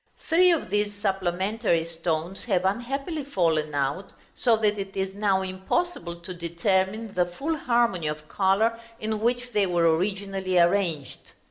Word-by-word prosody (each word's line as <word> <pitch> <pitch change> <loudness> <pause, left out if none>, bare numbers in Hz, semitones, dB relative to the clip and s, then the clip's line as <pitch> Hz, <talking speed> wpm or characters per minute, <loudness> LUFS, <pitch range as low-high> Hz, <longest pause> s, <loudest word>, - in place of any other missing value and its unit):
Three 360 +3 +5
of 330 - +1
these 205 0 0
supplementary 190 -1 0
stones 165 +2 -3
have 190 -5 +1
unhappily 275 - -2
fallen 160 - 0
out, 145 +7 -1 0.2
so 235 -3 +2
that 210 -1 +1
it 195 0 -6
is 190 0 -1
now 200 -2 +1
impossible 185 - -2
to 180 +2 -7
determine 190 +5 -1
the 180 -1 +2
full 280 - -3
harmony 235 - +1
of 150 0 -5
color 205 +6 +2 0.2
in 215 0 -2
which 245 +2 0
they 205 -3 +2
were 170 -2 +3
originally 195 0 -1
arranged. 170 -5 +2
195 Hz, 145 wpm, -26 LUFS, 175-220 Hz, 0.2 s, Three